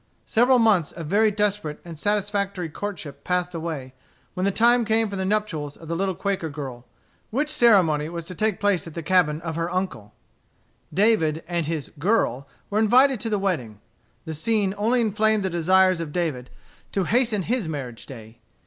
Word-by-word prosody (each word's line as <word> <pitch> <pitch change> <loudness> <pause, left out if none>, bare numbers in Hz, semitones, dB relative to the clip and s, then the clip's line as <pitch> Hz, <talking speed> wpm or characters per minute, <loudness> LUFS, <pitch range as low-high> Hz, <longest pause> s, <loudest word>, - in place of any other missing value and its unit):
Several 250 +3 +4
months 215 -9 +3
of 165 - -7
very 210 +7 +3
desperate 205 -7 -1
and 165 -3 -9
satisfactory 200 -3 -1
courtship 155 -6 -6
passed 180 0 -1
away, 160 -6 -5 0.4
when 185 - -1
the 200 - +2
time 235 +4 +4
came 225 0 +1
for 200 - -5
the 190 -1 -2
nuptials 185 -8 -2
of 165 - -13
the 165 - -2
little 190 +1 -1
Quaker 190 -3 -2
girl, 130 -5 -7 0.4
which 290 +6 -1
ceremony 185 - +4
was 170 -1 -6
to 180 - -6
take 215 +2 -1
place 200 -4 +1
at 165 - -10
the 170 - -4
cabin 160 -3 +2
of 165 -1 -4
her 165 +1 -1
uncle 150 - -4 0.8
David 180 -7 +2
and 170 -3 -1
his 160 -3 -3
"girl" 145 - +1 0.2
were 210 - +1
invited 255 +4 +4
to 225 - -3
the 210 - +1
wedding. 135 - -2 0.5
The 160 - -4
scene 195 +4 0
only 230 +4 +1
inflamed 215 -1 +1
the 190 - -1
desires 185 +2 +3
of 160 -3 -5
David 145 -7 -2 0.4
to 195 - +1
hasten 225 -1 +1
his 230 -4 -1
marriage 130 -6 -6
day. 115 -3 -11
185 Hz, 180 wpm, -24 LUFS, 160-210 Hz, 0.8 s, Several